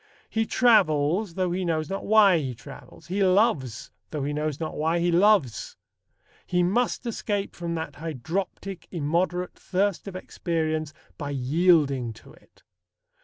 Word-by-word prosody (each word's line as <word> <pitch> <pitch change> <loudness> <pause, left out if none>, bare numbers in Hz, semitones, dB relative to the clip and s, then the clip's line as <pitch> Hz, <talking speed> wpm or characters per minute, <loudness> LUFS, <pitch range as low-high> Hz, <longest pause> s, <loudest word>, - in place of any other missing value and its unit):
He 225 0 0
travels, 180 - +3
though 185 -2 0
he 185 +2 -1
knows 160 -3 -1
not 195 +3 -4
why 205 -5 +6
he 130 -5 -4
travels. 125 +6 -13
He 190 +4 0
loves, 185 - +1 0.2
though 150 -3 -3
he 145 +1 -2
knows 150 -1 -2
not 160 -1 -4
why 160 +3 +1
he 175 +1 +1
loves. 180 - +2 0.7
He 180 0 +2
must 235 +7 0
escape 205 -3 -3
from 170 -1 -4
that 160 -3 -5
"hydroptic, 165 +5 -4
immoderate" 175 +3 -1
thirst 195 +1 -1
of 195 - -7
experience 160 -4 -2 0.3
by 145 -2 -4
yielding 140 -3 +2
to 110 - -16
it. - - -24
170 Hz, 145 wpm, -26 LUFS, 150-195 Hz, 0.7 s, why